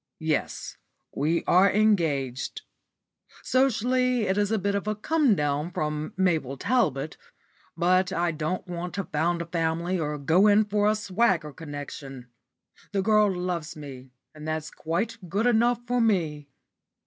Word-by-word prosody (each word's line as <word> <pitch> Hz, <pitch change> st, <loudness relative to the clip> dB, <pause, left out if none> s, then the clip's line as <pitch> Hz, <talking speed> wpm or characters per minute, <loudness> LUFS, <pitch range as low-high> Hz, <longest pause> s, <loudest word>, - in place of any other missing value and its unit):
Yes, 160 Hz, -1 st, -2 dB, 0.4 s
we 160 Hz, +4 st, 0 dB
are 185 Hz, +2 st, +5 dB
engaged. 165 Hz, -, 0 dB, 0.8 s
Socially 255 Hz, -1 st, +2 dB
it 190 Hz, -2 st, +1 dB
is 205 Hz, 0 st, +1 dB
a 220 Hz, -, +2 dB
bit 200 Hz, 0 st, -1 dB
of 200 Hz, +1 st, -2 dB
a 215 Hz, -, 0 dB
come 280 Hz, +1 st, +2 dB
down 150 Hz, 0 st, -1 dB
from 155 Hz, -1 st, -3 dB
Mabel 160 Hz, -8 st, +1 dB
Talbot, 245 Hz, -, 0 dB, 0.6 s
but 185 Hz, +1 st, +2 dB
I 175 Hz, -2 st, 0 dB
don't 155 Hz, +4 st, -3 dB
want 175 Hz, 0 st, -5 dB
to 200 Hz, -, -2 dB
found 170 Hz, +2 st, -1 dB
a -, -, -10 dB
family 170 Hz, +2 st, -1 dB
or 150 Hz, -1 st, -2 dB
go 165 Hz, +8 st, +4 dB
in 210 Hz, +1 st, +5 dB
for 205 Hz, 0 st, +2 dB
a 215 Hz, -, +2 dB
swagger 190 Hz, -7 st, 0 dB
connection. 140 Hz, -4 st, -8 dB, 0.6 s
The 195 Hz, -1 st, +1 dB
girl 210 Hz, -1 st, +4 dB
loves 180 Hz, -3 st, -3 dB
me, 135 Hz, -4 st, -10 dB, 0.2 s
and 155 Hz, 0 st, -9 dB
that's 155 Hz, 0 st, -3 dB
quite 175 Hz, +8 st, -3 dB
good 205 Hz, +7 st, 0 dB
enough 240 Hz, 0 st, +2 dB
for 245 Hz, 0 st, +1 dB
me." 160 Hz, -10 st, 0 dB
180 Hz, 150 wpm, -26 LUFS, 155-210 Hz, 0.8 s, are